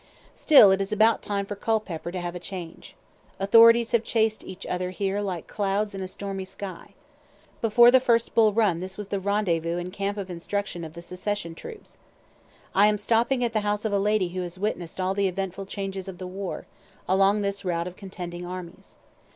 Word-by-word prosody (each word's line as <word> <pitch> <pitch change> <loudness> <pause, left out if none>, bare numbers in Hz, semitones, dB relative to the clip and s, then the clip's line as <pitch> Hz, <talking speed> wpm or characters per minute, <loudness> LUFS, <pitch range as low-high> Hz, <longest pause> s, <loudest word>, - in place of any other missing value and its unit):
Still 270 - +7
it 190 +1 +2
is 195 - -3
about 220 +2 +3
time 200 -1 -2
for 205 - -5
Culpepper 200 -6 -2
to 180 - -4
have 175 -1 -4
a 180 - -6
change. 175 -2 -8 0.4
Authorities 230 +3 +6
have 235 -1 +2
chased 220 -2 0
each 190 0 -9
other 180 0 -2
here 195 +2 -2
like 185 -5 -4
clouds 205 +1 -1
in 195 - -5
a 185 - -4
stormy 195 0 -5
sky. 185 -1 -9 0.7
Before 235 +2 +6
the 260 - +7
first 235 -2 +1
Bull 220 -2 +5
Run 205 -6 +2
this 185 +1 -6
was 210 -1 -7
the 200 - -1
rendezvous 175 -4 0
and 180 +1 -5
camp 200 +1 -2
of 195 -2 -5
instruction 175 0 -4
of 160 -1 -8
the 170 +1 -10
secession 180 -1 -4
troops. 440 - -11 0.7
I 200 +2 +6
am 210 0 +2
stopping 235 +4 +1
at 235 -1 -1
the 215 - +2
house 210 +1 -2
of 215 - 0
a 200 - +2
lady 205 -2 +1
who 185 +1 -4
has 175 0 -6
witness'd 185 -4 -3
all 185 +1 0
the 200 0 +1
eventful 195 +1 -4
changes 195 -1 -5
of 190 -2 -7
the 185 - -7
war, 190 +1 -5 0.4
along 195 +2 +3
this 200 0 -3
route 170 -2 -1
of 180 0 -7
contending 180 -3 -7
armies. 180 -1 -8
195 Hz, 200 wpm, -26 LUFS, 180-210 Hz, 0.7 s, Still